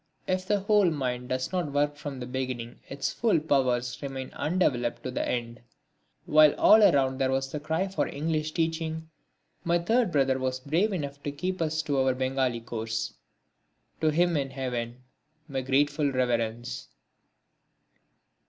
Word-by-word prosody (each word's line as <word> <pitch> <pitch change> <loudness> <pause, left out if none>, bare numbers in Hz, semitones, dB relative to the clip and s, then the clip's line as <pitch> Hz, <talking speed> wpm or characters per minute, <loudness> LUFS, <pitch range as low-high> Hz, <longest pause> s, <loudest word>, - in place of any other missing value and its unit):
If 185 0 -1
the 205 -1 +2
whole 205 -2 +4
mind 125 -5 -3
does 130 0 -2
not 180 -6 -1
work 145 0 +1
from 140 -2 -6
the 125 - -5
beginning 125 -2 -4
its 140 0 -2
full 225 -8 +2
powers 125 -5 0
remain 135 -2 -5
undeveloped 135 -9 0
to 130 - -3
the - - -1
end. 115 -1 -3 0.6
While 155 -1 +6
all 220 - +7
around 135 -8 +4
was 135 0 0
the 150 - -3
cry 160 +5 -1
for 190 - -1
English 155 +1 -2
teaching, 160 -1 -2 0.5
my 170 0 +2
third 225 +4 +1
brother 135 -3 +2
was 130 0 -1
brave 165 +11 +1
enough 145 -6 -4
to 145 - -3
keep 180 +5 -3
us 160 0 0
to 145 -3 0
our 130 -1 +2
Bengali 130 -2 0
course. 110 -1 -3 0.9
To 155 - +3
him 170 +2 +2
in 140 -2 0
heaven 125 -2 -4 0.4
my 135 -3 -2
grateful 145 +2 +2
reverence. 120 - -1
140 Hz, 155 wpm, -28 LUFS, 130-160 Hz, 0.9 s, all